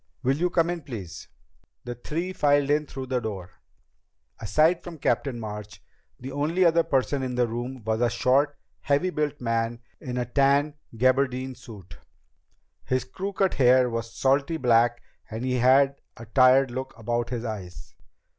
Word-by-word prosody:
"Will 135 +2 +2
you 180 +3 +1
come 170 -1 +1
in, 175 -1 -4
please." 110 - -8 0.6
The 120 - -5
three 165 +9 -4
filed 145 -3 +2
in 150 0 +1
through 135 -1 -6
the 130 -1 -1
door. 95 -6 -7 0.8
Aside 155 - +2
from 175 -2 -8
Captain 135 -3 -1
March, 105 -3 -7 0.4
the 130 +2 -7
only 155 +6 +1
other 170 0 +5
person 135 -2 0
in 130 -1 -3
the 125 -1 +2
room 120 +2 -5
was 110 +1 0
a 120 - +3
short, 135 +5 +1 0.2
heavy 145 +6 +1
built 150 -3 -2
man 115 0 -1 0.2
in 125 -1 -5
a 125 - -1
tan 140 +4 +2 0.2
gabardine 130 +1 +1
suit. 95 -8 -13 0.8
His 130 0 -1
crew 185 +10 -5
cut 195 -1 +1
hair 125 -1 +4
was 115 0 -4
salty 140 +4 +1
black 120 -2 +2 0.3
and 115 +3 -5
he 125 -1 0
had 135 +3 +4 0.2
a 115 - -10
tired 130 +2 +4
look 130 0 -6
about 120 +1 -2
his 120 -1 -4
eyes. 90 -9 -7
130 Hz, 165 wpm, -26 LUFS, 115-145 Hz, 0.8 s, other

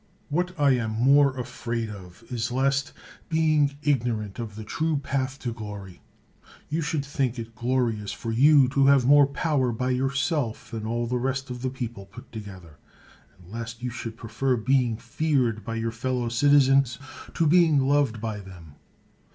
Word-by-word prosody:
What 180 +3 -2
I 145 -1 +5
am 120 -4 +1
more 135 +3 +4
afraid 120 -2 -4
of 95 0 -12
is 120 0 -2
lest, 135 +3 +1 0.4
being 155 -3 +2
igno 125 -6 +1
rant 105 +1 -8
of 110 -3 -6
the 110 - -7
true 155 +8 -1
path 135 -1 -2
to 120 -2 -3
glory, 100 -5 -9 0.7
you 160 +2 -1
should 150 -2 -2
think 135 -3 -1
it 115 0 -7
glorious 120 -4 -1
for 115 - -5
you 140 +3 +6
to 135 0 +3
have 140 -3 +5
more 145 +1 +6
power 140 -3 0
by 125 +3 -1
your 130 +2 0
self 140 -4 -2
than 110 -2 -5
all 120 +1 -1
the 125 +1 -1
rest 135 +1 -2
of 125 -1 -6
the 130 - -1
i)eople 120 -6 -7
put 120 +5 -13
together, 95 -8 -10 0.6
and 90 0 -17
lest 115 +1 -7
you 125 - -2
should 115 -1 -7
prefer 125 +3 -1
being 125 -1 +1
feared 120 -3 0
by 115 - -4
your 115 0 -2
fellow 120 +1 -2
citizens 135 0 +4 0.4
to 165 - +2
being 160 -1 +5
loved 140 -5 +2
by 110 -1 -4
them. 90 -6 -13
125 Hz, 175 wpm, -25 LUFS, 115-140 Hz, 0.7 s, you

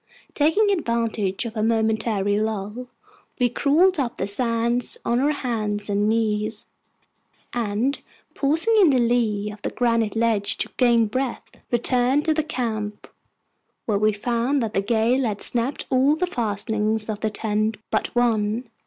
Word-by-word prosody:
Taking 395 +8 +3
advantage 230 - -1
of 230 0 -6
a 215 - -1
momentary 220 -2 +1
lull, 215 +3 -3 0.5
we 245 -2 +2
crawled 310 +8 +3
up 245 -4 -2
the - - -1
sands 230 +3 0
on 240 +1 +1
our 280 +3 +2
hands 215 -7 -2
and 205 +1 +1
knees, 215 -1 -1 0.9
and, 235 +4 -1 0.3
pausing 320 +10 +2
in 360 - +6
the 265 - +3
lee 230 -4 +1
of 210 0 -12
the - - -2
granite 230 -3 0
ledge 225 -3 +1
to - - -2
gain 235 -3 +4
breath, 255 +3 -3 0.3
returned 250 +4 +2
to 320 - +3
the 315 - +1
camp, 220 -8 -4 0.8
where 205 -3 0
we 215 +1 +3
found 240 +5 0
that 220 -1 -3
the 195 - +1
gale 230 +5 +1
had 210 -4 -2
snapped 245 +3 0
all 265 +3 +4
the 360 +3 0
fastenings 220 - -1
of 215 -2 -4
the 220 - -1
tent 215 0 -1
but - - +1
one. 230 0 +1
230 Hz, 155 wpm, -23 LUFS, 215-250 Hz, 0.9 s, in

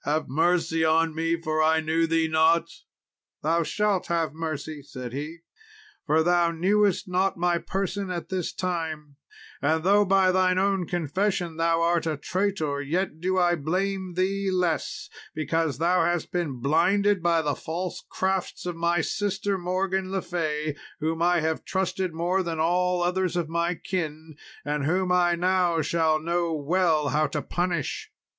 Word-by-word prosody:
have 150 +1 0
mercy 165 +3 +1
on 160 0 +3
me, 165 +1 0
for 155 -1 -1
I 160 0 +4
knew 160 +1 +1
thee 165 0 +2
not." 160 +1 +3 0.7
"Thou 165 +3 +2
shalt 205 +3 0
have 165 -2 0
mercy," 155 -2 -5
said 125 -3 -8
he, 150 +4 -6 0.7
"for 160 +1 +3
thou 175 0 +3
knewest 195 +4 +1
not 185 +1 0
my 175 0 +1
person 195 +1 -3
at 175 -2 -4
this 185 -3 -2
time; 160 -5 -4 0.4
and 155 +2 +1
though 200 +3 +5
by 190 -1 +4
thine 185 0 +2
own 195 -2 +1
confession 175 +1 -1
thou 165 0 +2
art 170 -1 +1
a 155 -2 -1
traitor, 165 -4 -1
yet 160 +2 -2
do 185 +1 0
I 175 -1 +3
blame 185 +3 -2
thee 195 +2 0
less, 180 -3 -1 0.3
because 155 0 -1
thou 175 +4 +2
hast 175 -2 -1
been 155 -9 -2
blinded 185 +7 +2
by 170 -1 +2
the 145 -1 0
false 170 +5 -5
crafts 190 -1 -2
of 175 -1 -3
my 170 0 +1
sister 205 +2 -1
Morgan 185 +1 -1
le 190 -1 -2
Fay, 155 -4 -2 0.2
whom 160 +1 -2
I 175 -1 +3
have 160 0 -1
trusted 190 -1 -1
more 175 +4 0
than 165 -3 -3
all 180 +2 +2
others 180 0 0
of 170 -3 -1
my 170 +1 0
kin, 160 -3 -4 0.3
and 145 0 -1
whom 180 +3 +1
I 175 -1 +3
now 175 -2 +1
shall 160 0 +2
know 170 0 -1
well 155 0 +1
how 150 +3 +2
to 150 - -3
punish." 175 -4 -2
170 Hz, 160 wpm, -26 LUFS, 160-185 Hz, 0.7 s, though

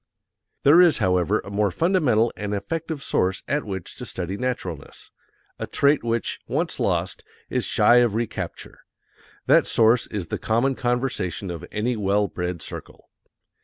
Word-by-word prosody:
There 155 +6 +7
is, 175 -3 +5
however, 90 -3 +1
a 100 - -10
more 100 0 +1
fundamental 130 - +2
and 105 0 -3
effective 160 +6 -4
source 95 +1 0
at 150 +1 -1
which 95 -4 -6
to - - -6
study 95 +1 -4
naturalness 100 - -5 0.5
a - - -4
trait 140 -1 +2
which, 115 0 -2
once - - -2
lost, - - -1 0.3
is - - 0
shy 120 - +4
of 120 -4 +3
recapture: 115 0 -5 0.7
that - - +4
source 115 +1 +3
is 100 -6 -5
the - - -3
common 120 +5 +1
conversation 120 -8 -2
of 85 0 -7
any 115 +4 -1
well 100 -1 +1
bred 90 -2 -4
circle. - - -10
110 Hz, 150 wpm, -23 LUFS, 95-125 Hz, 0.7 s, There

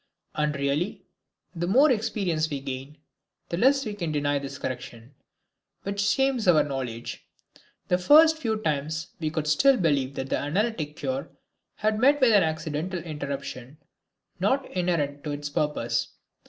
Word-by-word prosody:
And 150 -1 0
really, 140 +6 -1 0.5
the 175 -1 -3
more 265 +10 +5
experience 200 -9 0
we 145 -2 -3
gain, 135 +2 -7 0.5
the 170 - -2
less 270 +6 +3
we 215 - -3
can 175 -6 -3
deny 145 -1 0
this 140 0 -7
correction, 125 -1 -7 0.7
which 200 0 -2
shames 255 +2 +1
our 165 -4 +6
knowledge. 130 -5 -5 0.6
The 180 - +2
first 315 - +6
few 225 -6 -1
times 155 -2 -2
we 155 -2 -1
could 155 -1 -2
still 260 - +4
believe 140 -7 +1
that 135 0 -4
the - - +1
analytic 155 -1 -1
cure 265 - -3 0.5
had 215 0 0
met 280 +4 +5
with 255 -4 +5
an 205 - +6
accidental 160 +2 -2
interruption, 140 -3 -6 0.6
not 270 0 +1
inherent 160 -6 -1
to 150 - -2
its 145 0 -5
purpose. 120 -6 0
155 Hz, 150 wpm, -26 LUFS, 145-210 Hz, 0.7 s, our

